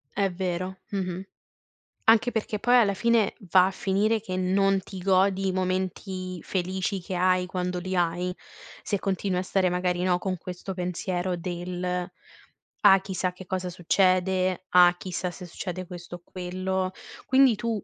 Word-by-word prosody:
È 200 -1 +1
vero, 185 +1 -3
mh-mh. 185 -2 -2 0.9
Anche 230 +2 +5
perché 215 -2 -2
poi 245 +3 +4
alla 210 -5 +4
fine 230 0 +2 0.2
va 185 -1 +7
a - - -2
finire 205 +3 +1
che 185 -3 -4
non 195 +1 +2
ti 190 0 -9
godi 190 +1 +2
i 190 - +1
momenti 185 -1 -3
felici 190 +2 -2
che 185 +1 -5
hai, 185 0 +2
quando 180 0 -2
li 185 +1 -3
hai, 175 +1 0 0.5
se 205 - -1
continui 190 -1 -1
a - - 0
stare 185 0 +1
magari, 180 0 0
no, 180 -1 +3
con 185 0 -3
questo 180 +2 -6
pensiero 180 0 -2
del: 180 +1 -3 0.7
"Ah 195 -2 +7
chissà 185 -2 -2
che 185 0 -11
cosa 185 0 -3
succede, 185 +1 +2
ah, 180 0 +6
chissà 180 0 -4
se 180 +1 -9
succede 185 +1 -5
questo 175 -1 -9
o 175 - -12
quello". 185 +1 -3 0.3
Quindi 260 -2 +5
tu 225 -2 -2
185 Hz, 160 wpm, -26 LUFS, 180-195 Hz, 0.9 s, va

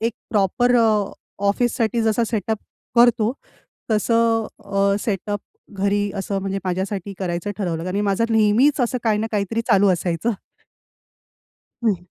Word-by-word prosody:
एक 230 +1 0 0.2
प्रॉपर 240 +5 +2
अ, 225 - +4 0.6
ऑफिससाठी 230 +1 +1
जसा 225 +1 +2
सेटअप 220 -1 -2 0.4
करतो, 235 -1 +5 0.6
तसं 225 +1 +2 0.2
अ, 200 0 +1
सेटअप 205 -1 -2 0.4
घरी 200 +1 +1
असं 195 0 -2
म्हणजे 195 0 -2
माझ्यासाठी 190 +1 -3
करायचं 175 +1 -3
ठरवलं 170 -4 -2
कारण 185 +1 -3
की - - +1
माझं 200 +2 +1
नेहमीच 225 +7 +4
असं 250 +1 0
काही 215 -2 +2
ना 220 - -1
काहीतरी 210 +2 0
चालू 200 +1 +5
असायचं. 175 +4 -1 1.5
हं. 195 -6 0
210 Hz, 135 wpm, -21 LUFS, 195-230 Hz, 1.5 s, करतो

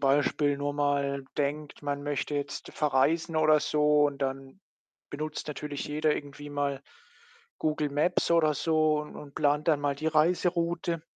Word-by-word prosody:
Beispiel 145 +1 +2
nur 145 0 -2
mal 140 -1 0
denkt, 145 +1 -2
man 145 0 -2
möchte 145 0 -2
jetzt 140 -1 -4
verreisen 155 +3 +1
oder 155 -1 +5
so, 150 0 +3
und 140 -1 -5
dann 135 +6 -4 0.5
benutzt 155 +1 -5
natürlich 150 -1 -5
jeder 150 +1 +1
irgendwie 145 0 -7
mal 140 -1 -2 0.8
Google 155 -1 0
Maps 155 +6 +1
oder 165 -2 +4
so 155 -1 +2
und 150 - -9
und 145 -2 -11
plant 145 0 +1
dann 150 -3 +3
mal 145 -1 0
die 155 - -4
Reiseroute. 170 +1 +1
150 Hz, 150 wpm, -28 LUFS, 145-155 Hz, 0.8 s, oder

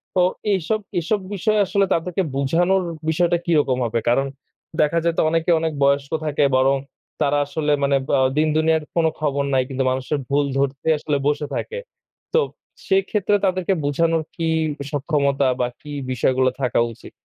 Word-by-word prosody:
তো 180 - +4 0.3
এইসব 195 +4 0 0.2
এইসব 200 +5 0
বিষয়ে 210 +2 +1
আসলে 195 +1 +2
তাদেরকে 180 +3 -1
বুঝানোর 175 +7 +2 0.3
বিষয়টা 175 +2 +2
কিরকম 150 -6 +2
হবে? 115 0 0
কারণ 135 +3 +2 0.6
দেখা 150 +3 +2
যায় 170 -1 +2
তো - - +4
অনেকে 165 +1 +1
অনেক 160 -1 -1
বয়স্ক 140 0 +2
থাকে 150 -1 +1
বরং 135 +1 +3 0.4
তারা 145 +1 +2
আসলে 150 +1 -2
মানে 140 0 +3
বা 140 - +3 0.2
দিন-দুনিয়ার 155 0 +2
কোন 165 -1 +3
খবর 140 -2 0
নাই, 130 -1 +3
কিন্তু 135 0 -1
মানুষের 130 +3 -2
ভুল 145 +1 +2
ধরতেই 140 +3 +1
আসলে 150 -1 -1
বসে 150 0 0
থাকে। 475 - -4 0.6
তো - - +6 0.5
সেক্ষেত্রে 195 +1 +2
তাদেরকে 185 0 +1
বুঝানোর 165 +3 +1
কি 165 -1 -2 0.4
সক্ষমতা 140 -2 +1
বা 125 - +1
কি 150 - -10 0.2
বিষয়গুলো 130 +1 +2
থাকা 125 -2 +1
উচিত? - - -14
150 Hz, 155 wpm, -21 LUFS, 140-170 Hz, 0.6 s, তো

